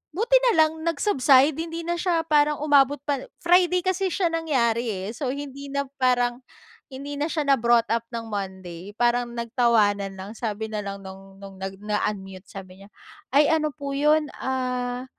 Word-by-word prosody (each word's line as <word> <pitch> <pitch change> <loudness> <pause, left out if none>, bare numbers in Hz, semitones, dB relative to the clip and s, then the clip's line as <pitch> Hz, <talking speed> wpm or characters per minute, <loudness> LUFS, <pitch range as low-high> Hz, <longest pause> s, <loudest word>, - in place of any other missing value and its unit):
buti 465 +6 +4
na - - 0
lang 310 - -2
nag-subside 290 -4 +3
hindi 330 0 -5
na 345 - -1
siya 335 -3 0
parang 300 -1 +3
umabot 285 -1 +4
pa 280 -3 -1 0.2
Friday 360 +1 +4
kasi 375 0 0
siya 365 +2 -1
nangyari, 245 -8 0
eh. 195 0 -4
So, 270 0 -3
hindi 280 0 -7
na 280 0 -1 0.2
parang 245 0 +2 0.5
hindi 280 +2 -7
na 300 +3 -1
siya 305 -3 -1
na 275 -1 +5
brought 235 0 +4
up 230 0 -1
ng 230 -1 -4
Monday. 190 -2 -6
Parang 240 0 +1
nagtawanan 215 -5 +1
lang 195 +2 -8
sabi 220 -1 -3
na 210 -1 -2
lang 200 0 -7
no'ng 195 0 -12
no'ng 195 -1 -10
nag-unmute, 195 -1 -4
sabi 190 0 -11
niya, 200 - -16 0.4
"Ay, 290 +2 +5
ano 310 -1 +1
po 280 +1 -6
'yon, 300 +2 +3
ah, 250 -1 -2
250 Hz, 170 wpm, -24 LUFS, 210-300 Hz, 0.5 s, na